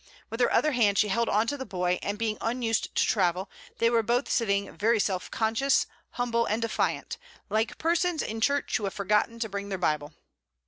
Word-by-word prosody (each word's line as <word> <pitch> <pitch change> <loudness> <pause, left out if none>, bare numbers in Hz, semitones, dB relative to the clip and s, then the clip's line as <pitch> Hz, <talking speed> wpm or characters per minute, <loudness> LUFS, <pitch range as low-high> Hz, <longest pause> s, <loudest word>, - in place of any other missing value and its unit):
With 225 - -5
her 245 - +3
other 305 - +3
hand 215 -6 +2
she 210 - +3
held 235 +3 +1
on 215 +2 +2
to 285 +5 -2
the 265 - -4
boy, 180 -4 -1
and 205 +1 -3
being 215 -1 -2
unused 225 -1 -1
to - - +3
travel, 180 +2 +1 0.3
they 230 - +3
were 230 -1 +3
both 240 +4 0
sitting 200 -4 0
very 220 +1 +2
self 190 -3 -1
conscious, 230 +5 +2 0.3
humble, 235 -1 0
and 215 - 0
defiant, 230 -1 -2 0.3
like 220 +2 0
persons 340 0 +1
in 225 +1 -4
church 285 +3 +1
who 210 - -4
have 195 - -4
forgotten 210 +3 +1
to 230 -1 -2
bring 200 0 -5
their 190 - -2
Bible. 150 -4 -1
225 Hz, 200 wpm, -27 LUFS, 200-235 Hz, 0.3 s, her